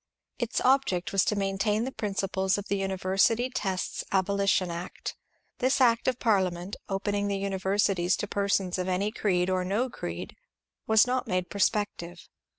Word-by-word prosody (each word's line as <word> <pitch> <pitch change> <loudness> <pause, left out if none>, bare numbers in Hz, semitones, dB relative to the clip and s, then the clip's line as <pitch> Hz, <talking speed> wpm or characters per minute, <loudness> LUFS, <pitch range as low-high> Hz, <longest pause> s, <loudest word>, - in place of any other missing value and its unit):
Its 240 -2 -1
object 255 -10 +2
was 195 -1 +3
to 210 - 0
maintain 200 +2 0
the 260 - -3
prin 210 -5 -4
ciples 190 0 0
of 205 0 -6
the 200 - +1
University 195 +6 +1
Tests 190 -6 -2
Abolition 195 -1 +2
Act. 170 +1 -6 0.4
This 260 +2 +2
act 235 -3 +3
of 255 -2 +2
Parliament, 190 -5 0
opening 205 +1 -1
the 200 -1 -1
universities 195 -1 +1
to 205 - -3
persons 195 -2 0
of 180 - -2
any 190 +3 0
creed 180 -5 +1
or 185 -1 0
no 220 +7 -1
creed, - - -6 0.5
was 220 -1 +6
not 250 0 -1
made 185 -1 -1
prospective. 200 -4 -1
195 Hz, 155 wpm, -28 LUFS, 185-215 Hz, 0.5 s, was